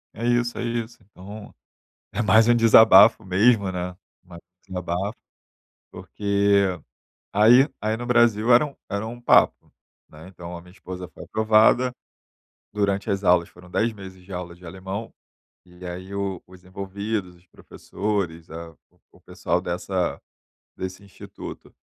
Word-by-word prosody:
É 115 - -7
isso, 120 0 +1
é - - -3
isso. 120 -1 -4
Então, 105 +1 -12 0.6
é - - -3
mais 110 +1 +4
um 120 - +5
desabafo 110 -1 +7
mesmo, 100 +2 +3
né. 90 0 -5 0.3
Mais 85 -2 -13 0.3
um - - -12
desabafo, 90 +3 -3 0.8
porque 100 -2 0 0.5
aí 120 +8 +5
aí 110 +1 0
no 120 +2 -6
Brasil 120 -1 +3
era 125 +5 +6
um 145 - -10
era 100 +2 -3
um 120 +1 -9
papo, - - +3 0.4
né. 80 +3 -13
Então, 90 -2 -9
a 85 - -11
minha 90 +1 -17
esposa 90 -1 -8
foi - - -13
aprovada. 110 +3 +3 0.8
Durante 100 -1 -1
as 100 0 -1
aulas 90 -2 +3
foram 90 0 -17
10 115 +3 0
meses 95 -2 -12
de 95 +2 -12
aula 90 -1 -6
de 90 +1 -16
alemão. 95 +5 -7 0.5
E 90 0 -14
aí 90 +2 -7
o 100 -3 -3
os 90 -1 -17
envolvidos, 100 0 -5
os 90 +1 -25
professores, 90 -2 -5
a 85 +1 -8 0.2
o - - -34
o - - -22
pessoal 85 - -2
dessa 90 +1 -3 0.6
desse 95 +1 -6
instituto, 100 - -11
100 Hz, 150 wpm, -23 LUFS, 90-110 Hz, 0.8 s, desabafo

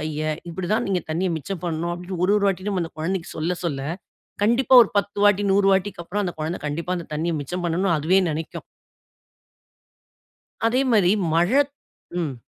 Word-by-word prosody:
கைய. 155 0 -3 0.3
இப்படிதான் 190 +7 -1
நீங்க 190 -2 +1
தண்ணிய 175 +4 0
மிச்சம் 165 +4 -6
பண்ணணும் 170 0 -2
அப்படின்னு 180 +1 -6
ஒரு 195 - +3
ஒரு 205 - +1
வாட்டியும் 195 +1 -1
நம்ம 190 -3 0
அந்த 165 - -9
குழந்தைக்கு 180 +2 -2
சொல்ல 165 +3 -1
சொல்ல 145 -5 -2 0.6
கண்டிப்பா 240 +5 +3
ஒரு 220 - -2
10 200 0 0
வாட்டி 205 -1 +4
100 195 0 +3
வாட்டிக்கு 190 -2 -1
அப்புறம் 205 +5 -2
அந்த 175 - -2
குழந்தை 155 +3 -3
கண்டிப்பா 165 +5 -3
அந்த 170 - -6
தண்ணிய 165 +3 -1
மிச்சம் 175 +6 -4
பண்ணணும் 170 +2 +1
அதுவே 170 +6 +3
நினைக்கும். 155 +1 -5 2.0
அதே 245 +3 +2
மாரி 200 -5 +4 0.2
மழத் 255 - +3 0.5
ம். 145 -6 -3
180 Hz, 170 wpm, -23 LUFS, 165-200 Hz, 2.0 s, வாட்டி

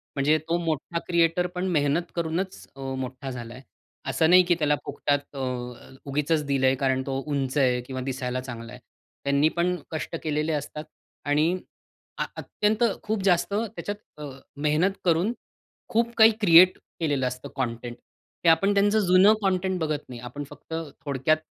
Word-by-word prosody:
म्हणजे 145 +2 +3
तो 170 - +2
मोठा 160 +2 -2
क्रिएटर 170 +1 +2
पण 180 +1 -1
मेहनत 150 +2 +1
करूनच 170 +3 -2
अ, - - -15 0.2
मोठा 130 +1 -5
झालाय. 120 0 -8 0.5
असं 160 - +2
नाही, 185 +1 +8
की 175 0 +2
त्याला 150 -1 +3
फुकटात 145 0 -2
अ, - - -5 0.7
उगीचच 150 +2 0
दिलंय; 135 -1 +2
कारण 130 0 +1
तो 135 0 -1
उंच 140 -1 -1
आहे 125 -3 +3
किंवा 130 +1 -6
दिसायला 130 -1 -3
चांगला 120 -2 -8
आहे. 125 - -10 0.4
त्यांनी 140 +2 +3
पण 180 +1 +2 0.2
कष्ट 160 +1 -4
केलेले 155 +1 0
असतात. 150 +1 -4 0.4
आणि 150 +3 +3 0.7
अ, - - +2
अत्यंत, 215 +2 0 0.2
खूप 215 -2 -2
जास्त 185 0 +2
त्याच्यात 205 -5 -5
अ, 145 - -5 0.3
मेहनत 155 +6 +2
करून 175 +6 +2 0.6
खूप 235 +1 +1
काही 220 0 +8
क्रिएट 180 -1 +7 0.2
केलेलं 145 -6 0
असतं 125 0 -6
काँटेंट 120 -2 -3 0.5
ते 170 - +6
आपण 195 +5 +4
त्यांचं 205 +2 +3
जुनं 185 +4 +6
काँटेंट 190 -1 0
बघत 155 -2 -1
नाही. 125 -2 -8
आपण 125 +4 -6
फक्त 145 +2 -11 0.3
थोडक्यात 140 +2 +2
150 Hz, 155 wpm, -26 LUFS, 135-180 Hz, 0.7 s, नाही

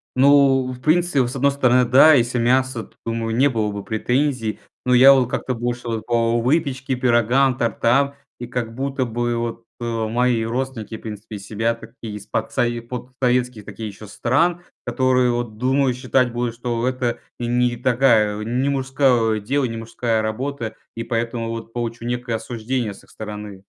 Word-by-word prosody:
Ну, 135 -1 +5
в 125 0 -9
принципе, 155 -3 +2
с 125 - -6
одной 140 +1 +3
стороны, 125 -2 +3
да, 140 +6 +7
если 120 -2 +2
мясо, 125 0 +1
то - - -20
думаю, 115 -1 -2
не 135 +4 +4
было 110 -4 -1
бы 100 -1 -6
претензий. 115 +1 -1 0.3
Но 125 - +3
я 130 +3 +9
вот 130 -3 +3
как-то 130 - -2
больше 120 0 -3
вот 115 -2 -3
по 115 0 +1
выпечке, 130 -1 0
пирогам, 125 +1 +3
тортам. 135 +4 +1 0.2
И 120 - -6
как 120 -2 -3
будто 135 +2 -2
бы 120 0 -1
вот, 115 0 -4 0.2
э, 115 -2 -2
мои 120 0 +1
родственники, 115 -2 -3
в - - -17
принципе, 105 0 -8
из 100 -1 -8
себя 115 +3 -1
такие 115 -2 -9
из 105 -1 -9
подсове 120 +2 -1
подсоветских 125 -1 -2
таких 110 - -7
ещё 105 +1 -10
стран, 165 - +1 0.2
которые, 125 0 +2
вот 120 -3 -3
думаю, 130 +2 +2
считать 125 0 +1
будут, 120 -1 -2
что 120 0 -2
это 125 -2 -1 0.2
не 120 - -3
не 120 0 +1
такая 115 -4 +2
не 125 +5 0
мужское 130 -5 +2
дело, 135 +6 0
не 115 -2 -4
мужская 115 0 -1
работа, 115 +1 -3 0.2
и 115 - -4
поэтому 115 0 -2
вот 115 0 -6
получу 120 -1 -4
некое 120 -1 -2
осуждение 115 0 -3
с - - -16
их - - -23
стороны. 105 -2 -8
120 Hz, 175 wpm, -21 LUFS, 115-130 Hz, 0.3 s, я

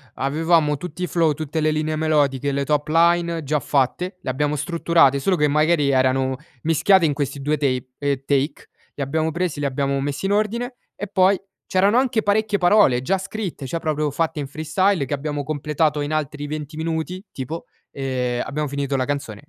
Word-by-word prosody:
avevamo 150 +1 +2
tutti 180 +3 -6
i - - 0
flow, 165 -1 +2
tutte 155 +1 -4
le 155 0 +2
linee 155 0 -1
melodiche, 145 -3 +1
le 140 0 -1
top 150 0 0
line 170 +1 +2
già 150 +2 0
fatte, 145 +8 0
le - - -5
abbiamo 145 +3 0
strutturate, 165 -2 +3
solo 185 +7 +1
che 150 -3 +2
magari 150 0 +2
erano 130 0 +2 0.3
mischiate 165 +3 +4
in 150 - +2
questi 140 -1 -3
due 150 +2 +1
tape, 130 -3 -1
ehm, 140 -2 -1
take. 140 +2 -1 0.3
Li 140 - -2
abbiamo 155 +4 0
presi, 170 -2 -2
li 145 - -1
abbiamo 140 0 -1
messi 145 +5 -3
in 195 - 0
ordine 230 +4 -1 0.2
e 205 - -5
poi 190 0 +3 0.3
c'erano 200 +5 +3
anche 250 -4 +1
parecchie 210 0 +1
parole 175 - +4
già 190 +8 +1
scritte, 190 -7 -5
cioè 165 +6 -3
proprio 155 -2 -1
fatte 160 +2 -1
in 140 - -3
freestyle 155 +4 0
che 135 - -4
abbiamo 145 0 -3
completato 150 +1 0
in 145 +1 -3
altri 150 -1 -2
20 150 0 -6
minuti 165 +3 -3
tipo, 145 +6 -6 0.3
ehm, 125 -3 -2
abbiamo 150 +1 -3
finito 140 0 -2
la 130 -1 +1
canzone. 140 -5 -4
150 Hz, 190 wpm, -22 LUFS, 140-170 Hz, 0.3 s, mischiate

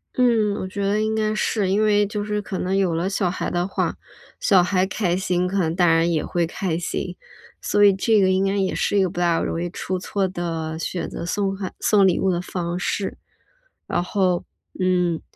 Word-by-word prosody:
嗯， 225 -5 +3
我 185 - -4
觉 200 +1 -4
得 200 +2 +1
应 215 0 0
该 215 -1 0
是， 210 -2 0
因 205 +3 +2
为 205 -1 +3
就 205 0 -3
是 210 0 -2
可 195 -1 -5
能 185 +2 -1
有 190 -4 +2
了 170 +3 -1
小 195 -2 0
孩 180 - -3
的 175 +1 0
话， - - -1 0.4
小 190 -5 +4
孩 185 0 +1
开 185 -3 0
心 180 -1 0
可 195 +2 -1
能 165 -2 0
大 175 -2 +4
人 165 +1 +2
也 155 -3 0
会 170 -1 0
开 170 -1 -2
心。 170 - -3 0.5
所 205 - +2
以 200 - +8
这 210 +2 +2
个 190 - +4
应 190 +1 +2
该 195 +1 0
也 195 -1 0
是 205 - 0
一 195 - +4
个 185 - 0
不 175 - -6
大 170 -2 +2
容 165 - -2
易 175 - -2
出 185 +1 -4
错 195 +1 -1
的， 165 -3 -4
选 175 - -3
择 - - -6
送 195 +2 -1
孩 190 -2 -5
送 200 -2 +4
礼 180 - +2
物 190 - +2
的 175 0 -1
方 175 -1 -4
式。 195 +1 -2 0.7
然 175 - 0
后， 185 -2 0 0.4
嗯， 180 -3 +1
185 Hz, 240 characters per minute, -22 LUFS, 175-200 Hz, 0.7 s, 以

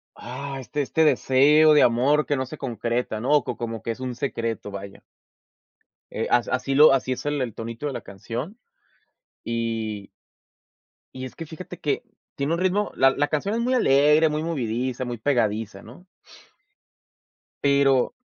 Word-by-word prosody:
ah, 135 +3 -7
este 145 +3 -3
este 160 +4 +1
deseo 150 +3 +5
de 150 - +6
amor 135 +6 +3
que 145 - 0
no 130 0 -2
se 155 +4 -9
concreta, 120 -2 -2
¿no? 145 +3 +2
Co - - -5
como 115 -1 -5
que 115 - -3
es 115 - -7
un 125 -2 -4
secreto, 115 -5 -3
vaya 100 0 -9 1.1
eh, - - -2
as 120 -1 +2
así, 130 +2 -1
lo 150 -1 +8
así 130 -1 0
es 130 +4 -8
el 145 -2 -1
el 120 -4 -3
tonito 115 +5 -6
de 140 - -4
la 120 - -5
canción, 120 - -7 0.9
y 115 -3 -3 1.0
y 130 0 -6
es 130 - -10
que, 165 - -7
fíjate 170 +2 -9
que 145 - -1 0.3
tiene 140 +4 -1
un 170 - -1
ritmo, 190 +3 0
la 135 0 +5
la 145 +2 0
canción 195 +8 -1
es 235 - -1
muy 255 +2 0
alegre, 150 - +4
muy 150 +1 -2
movidiza, 130 -4 -2
muy 120 -1 -4
pegadiza, 110 -5 -1
¿no? 125 +11 -14 1.6
Pero, 140 -2 +3
130 Hz, 165 wpm, -24 LUFS, 115-150 Hz, 1.6 s, lo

